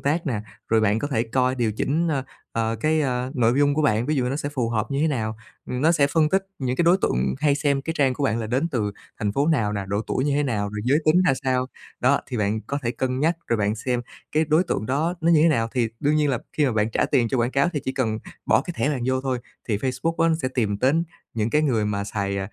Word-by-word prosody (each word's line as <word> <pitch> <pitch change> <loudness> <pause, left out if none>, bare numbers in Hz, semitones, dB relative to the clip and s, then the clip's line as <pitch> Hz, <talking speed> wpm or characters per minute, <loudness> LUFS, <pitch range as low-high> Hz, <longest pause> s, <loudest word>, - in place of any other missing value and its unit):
tác 160 +4 0
nè, 120 -7 -1 0.3
rồi 110 0 +3
bạn 105 0 +2
có 145 - -2
thể 115 -5 +1
coi 125 +2 +1
điều 115 -4 0
chỉnh, 160 +9 0
ơ, 135 -4 -1 0.3
ờ, 115 0 -1
cái 155 +2 +2 0.3
nội 120 -2 +3
dung 145 0 +3
của 155 - +1
bạn. 115 -3 +2
Ví 155 - +1
dụ 130 - +1
như 125 - -1
nó 140 - -1
sẽ 145 - -3
phù 130 -5 -1
hợp 110 +1 -1
như 140 0 0
thế 160 - +3
nào, 110 -6 -2 0.3
ừm, 125 - -2
nó 160 +4 +4
sẽ 150 -4 +3
phân 155 +1 +2
tích 190 +4 +1
những 130 -1 -1
cái 170 - +2
đối 175 +3 +5
tượng 65 +2 +1
hay 150 -1 +3
xem 140 -1 0
cái 160 - -2
trang 135 -2 +3
của 140 - -2
bạn 115 -3 +1
là 110 - -3
đến 130 +8 0
từ 110 -9 -1 0.3
thành 105 -1 -1
phố 140 +5 +1
nào 115 -10 +2
nè, 100 -1 -3
độ 100 +1 0
tuổi 130 - -1
như 145 - +1
thế 145 - +2
nào, 110 -7 -1
rồi 105 +1 -5
giới 140 +4 +3
tính 170 +4 +5
ra 175 - +5
sao, 130 -1 +1 0.3
đó, 140 +3 +3
thì 125 - -4
bạn 105 +1 0
có 140 - -4
thể 115 - 0
cân 130 +2 -2
nhắc 165 +3 +2
rồi 115 - +1
bạn 105 0 0
xem 120 +2 -1 0.3
cái 155 +1 +3
đối 155 +4 +4
tượng 110 - -2
đó 155 +7 0
nó 165 - +3
như 155 -3 +5
thế 165 - +6
nào. 115 -7 +1
Thì 120 -3 +1
đương 150 +1 +2
nhiên 150 -1 +2
là 125 - 0
khi 150 - +2
mà 125 - +1
bạn 110 0 +1
trả - - +1
tiền 125 -5 +2
cho 130 - 0
quảng 120 +1 +1
cáo 140 +4 +2
thì 145 - -2
chỉ 130 - -1
cần 110 -5 -1 0.3
bỏ - - +4
cái 175 - -6
thẻ - - +1
bạn 135 -5 -2
vô 130 0 +1
thôi 130 -2 -1 0.3
thì 105 - +1
Facebook 135 +8 -1
á 165 - +4
nó 165 - +3
sẽ 130 - 0
tìm 110 -6 -1
đến 145 +8 +2 0.3
những 110 0 0
cái 150 +4 +3
người 115 -8 +1
mà 100 -1 -1
xài, 100 -1 -2
130 Hz, 290 wpm, -24 LUFS, 115-150 Hz, 0.3 s, thế